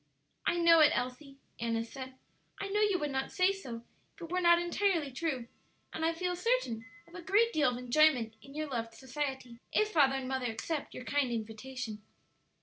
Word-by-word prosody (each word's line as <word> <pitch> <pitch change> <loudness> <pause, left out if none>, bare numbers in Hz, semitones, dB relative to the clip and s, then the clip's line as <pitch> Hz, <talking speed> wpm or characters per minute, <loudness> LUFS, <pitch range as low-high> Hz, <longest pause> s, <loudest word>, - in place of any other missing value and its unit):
"I 345 - +2
know 335 -1 +6
it, 310 +1 +6
Elsie," 270 +3 -4 0.2
Annis 230 0 -2
said; 260 -1 -7 0.4
"I 395 - -4
know 415 +2 +1
you 410 -3 +3
would 295 -4 -2
not 265 0 -2
say 370 0 +3
so 245 -13 -7 0.3
if - - -18
it 330 - -8
were 365 0 +1
not 345 -1 +6
entirely 345 -4 0
true, 260 -3 -2 0.5
and 320 - -3
I 325 - +3
feel 360 +2 -2
certain 360 - 0 0.2
of 340 - -19
a 355 - -7
great 425 +6 +3
deal 300 -4 +3
of 245 - -3
enjoyment 250 -2 +3
in 275 +4 -14
your 310 0 -2
loved 230 -4 -4
society, 265 -1 -5
if 430 0 +2
father 275 -7 +4
and 265 -1 -3
mother 260 -1 -1
accept 280 +7 -4
your 250 - -7
kind 280 -3 +1
invitation." 225 0 -5
280 Hz, 195 wpm, -32 LUFS, 245-345 Hz, 0.5 s, know